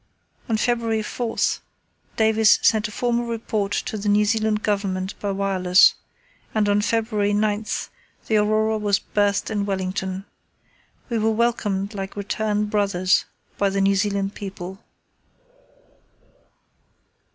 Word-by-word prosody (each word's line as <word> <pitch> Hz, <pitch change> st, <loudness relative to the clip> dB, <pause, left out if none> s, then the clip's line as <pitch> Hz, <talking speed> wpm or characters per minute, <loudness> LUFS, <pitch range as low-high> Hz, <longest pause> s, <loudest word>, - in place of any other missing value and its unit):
On 225 Hz, -, +2 dB
February 230 Hz, -1 st, 0 dB
4 230 Hz, +1 st, -4 dB, 0.8 s
Davis 220 Hz, -1 st, +5 dB
sent 220 Hz, 0 st, +3 dB
a -, -, -10 dB
formal 240 Hz, +1 st, 0 dB
report 220 Hz, -3 st, -2 dB
to 215 Hz, +1 st, -2 dB
the 205 Hz, +1 st, -1 dB
New 210 Hz, +1 st, +4 dB
Zealand 215 Hz, 0 st, 0 dB
Government 195 Hz, -2 st, -1 dB
by 205 Hz, -, -3 dB
wireless, 190 Hz, -2 st, +4 dB, 0.6 s
and 215 Hz, -1 st, +2 dB
on 205 Hz, 0 st, +3 dB
February 215 Hz, -2 st, 0 dB
9 210 Hz, +1 st, +1 dB, 0.6 s
the 220 Hz, -, +2 dB
Aurora 215 Hz, +1 st, +2 dB
was 205 Hz, -1 st, +2 dB
berthed 205 Hz, +1 st, 0 dB
at 210 Hz, -, -1 dB
Wellington. 190 Hz, -1 st, -3 dB, 0.8 s
We 230 Hz, -2 st, 0 dB
were 220 Hz, +1 st, +2 dB
welcomed 215 Hz, -3 st, 0 dB
like 195 Hz, -1 st, -6 dB
returned 210 Hz, +1 st, -1 dB
brothers 195 Hz, -3 st, +2 dB, 0.3 s
by 200 Hz, -, +3 dB
the 195 Hz, 0 st, -1 dB
New 195 Hz, 0 st, +4 dB
Zealand 200 Hz, 0 st, 0 dB
people. 190 Hz, -1 st, -7 dB
205 Hz, 125 wpm, -23 LUFS, 195-220 Hz, 0.8 s, Davis